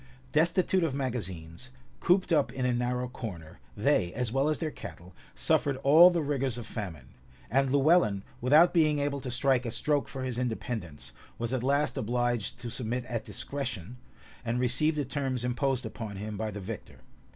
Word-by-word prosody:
Destitute 175 +3 +2
of 150 -5 0
magazines, 110 - -4 0.3
cooped 185 +1 +2
up 150 -3 +3
in 130 -1 -2
a 125 - +2
narrow 125 +1 -1
corner, 90 -10 -8 0.2
they, 85 - +2
as 125 -3 -1
well 135 +4 +2
as 155 - +1
their 160 -2 -3
cattle, 90 -8 -10 0.2
suffered 140 -2 +2
all 160 +6 +9
the 170 -3 0
rigors 135 -4 -1
of 120 - -6
famine; 80 - -6 0.4
and 135 +2 +3
Lewellyn, 140 - +4 0.2
without 150 +8 +6
being 155 -4 +4
able 140 0 -1
to 130 - -5
strike 125 +1 +2
a 120 - -3
stroke 145 +5 0
for 135 -1 -5
his 125 -2 -3
independence, 95 - -4 0.2
was 120 +2 -3
at 130 - 0
last 140 +3 +1
obliged 120 -1 -1
to 120 -2 -5
submit 120 +1 -3
at 115 -2 -4
discretion, 125 -6 -5 0.5
and 120 0 -1
receive 140 +6 +2
the 145 -2 -1
terms 130 -2 -2
imposed 130 +1 0
upon 110 -3 -6
him 105 +2 -5
by 110 +1 -2
the 105 -1 -6
victor. 100 +1 -8
125 Hz, 175 wpm, -29 LUFS, 110-140 Hz, 0.5 s, all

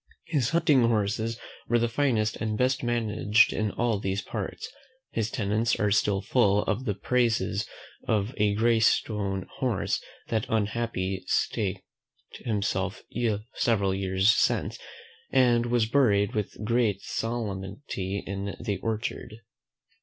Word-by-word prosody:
His 145 -8 0
hunting 155 -5 +4
horses 110 0 0 0.3
were 120 - +3
the 120 0 +2
finest 115 -4 +1
and 110 -1 -2
best 130 +2 +1
managed 115 -2 +2
in 110 0 0
all 115 -1 0
these 95 -1 -2
parts: 105 -2 -5 0.4
his 115 -1 -1
tenants 110 0 0
are 105 -1 +2
still 100 -1 +2
full 105 -3 +3
of 105 +7 -2
the 105 -5 -1
praises 120 +1 0 0.4
of 110 +2 0
a 105 -1 +2
gray 115 +1 +3
stone 100 -4 +1
horse - - 0 0.3
that 110 -2 0
unhappily 105 -3 -1
staked - - 0 0.6
himself 100 -3 -2 0.5
several 100 -6 +1
years 95 +2 +3
since, - - +1 0.5
and 120 -2 +4
was 120 -2 +2
buried 110 -5 +3
with 105 0 -3
great 110 -4 +1
solemnity 100 -3 -4
in 100 +1 -4
the 105 -4 -2
orchard. 110 0 -3
110 Hz, 125 wpm, -27 LUFS, 100-120 Hz, 0.6 s, hunting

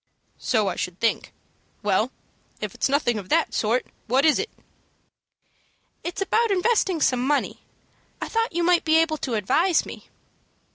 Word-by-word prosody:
"So 215 -5 +1
I 180 - -1
should 180 0 -4
think. 230 - 0 0.5
Well, - - +1 0.5
if - - -5
it's - - -1
nothing 255 -5 +1
of 190 -2 -10
that - - +2
sort, 230 +3 +1 0.2
what 260 +5 +3
is 310 - +4
it?" 445 - -2 1.5
"It's 345 +3 -2
about 455 +4 +1
investing 390 -2 +1
some 250 -3 +2
money. 285 +2 0 0.6
I - - -4
thought 455 +1 0
you 345 - +1
might 350 0 +3
be 320 0 +4
able 325 -1 +2
to 255 -5 -3
advise 320 - +2
me." - - -11
310 Hz, 155 wpm, -24 LUFS, 235-360 Hz, 1.5 s, is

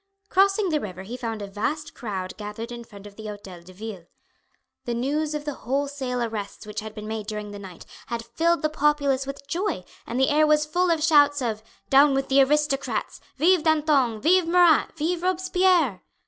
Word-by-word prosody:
Crossing 390 +1 +3
the 310 -2 +1
river 190 -6 -7
he 225 +6 -7
found 225 -4 -4
a - - -5
vast 265 +10 -3
crowd 190 -6 -5
gathered 215 +3 -7
in 240 0 -7
front 205 -3 -14
of 205 -1 -12
the 220 -1 -7
Hotel 200 -4 -9
de 180 +2 -15
Ville. 190 -3 -8 0.8
The 240 - -2
news 295 +5 -1
of 295 0 -4
the 295 - -2
wholesale 265 -1 -2
arrests 215 -3 -5
which 210 - -5
had 215 0 -8
been 210 0 -7
made 220 -1 -4
during 210 -1 -5
the 205 - -8
night 190 -3 -11 0.2
had 230 -1 -4
filled 335 +8 +1
the 310 - +2
populace 285 -3 +1
with 275 0 -7
joy, 340 - -2 0.2
and 240 +2 -2
the 265 - +3
air 305 +1 +4
was 300 0 +3
full 360 +4 +1
of 325 -2 +1
shouts 290 -3 +5
of 225 -4 -2 0.3
"Down 275 +1 +6
with 270 0 -1
the 275 +1 +5
Aristocrats!" 285 0 0 0.2
"Vive 345 +4 +4
Danton! 295 -7 +2
Vive 350 +6 +3
Marat! 345 -3 +5
Vive 335 +3 -1
Robespierre!" 360 - +2
270 Hz, 195 wpm, -25 LUFS, 215-310 Hz, 0.8 s, Down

